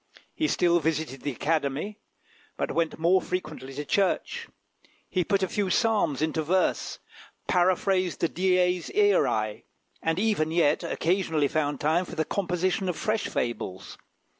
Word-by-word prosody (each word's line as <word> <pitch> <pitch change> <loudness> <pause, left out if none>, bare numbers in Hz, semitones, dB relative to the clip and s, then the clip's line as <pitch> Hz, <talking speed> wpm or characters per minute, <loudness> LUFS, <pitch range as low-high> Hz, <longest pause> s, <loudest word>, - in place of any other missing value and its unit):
He 310 - 0
still 175 - +3
visited 155 -4 -2
the 145 - -2
Academy, 155 - -1 0.6
but - - -1
he - - -4
went 165 -1 0
more 175 +3 +3
frequently 155 -7 -5
to 145 +1 -4
church; 205 - 0 0.6
he 185 -2 0
put 195 +1 +1
a - - +2
few 200 +1 -1
psalms 195 - +2
into 160 0 0
verse, 180 +4 0 0.5
paraphrased 185 -1 +2
the 170 - +3
Dies 180 0 +1
Iræ, 110 - +2 0.4
and 165 0 0
even 200 -6 +1
yet 160 -2 +2
occasionally 165 -4 +1
found 145 -1 -1
time 160 +5 +2
for 175 - -9
the 160 -1 0
composition 185 +1 -1
of 175 - -2
fresh 215 0 -1
fables. 115 -6 -4
175 Hz, 145 wpm, -27 LUFS, 155-190 Hz, 0.6 s, still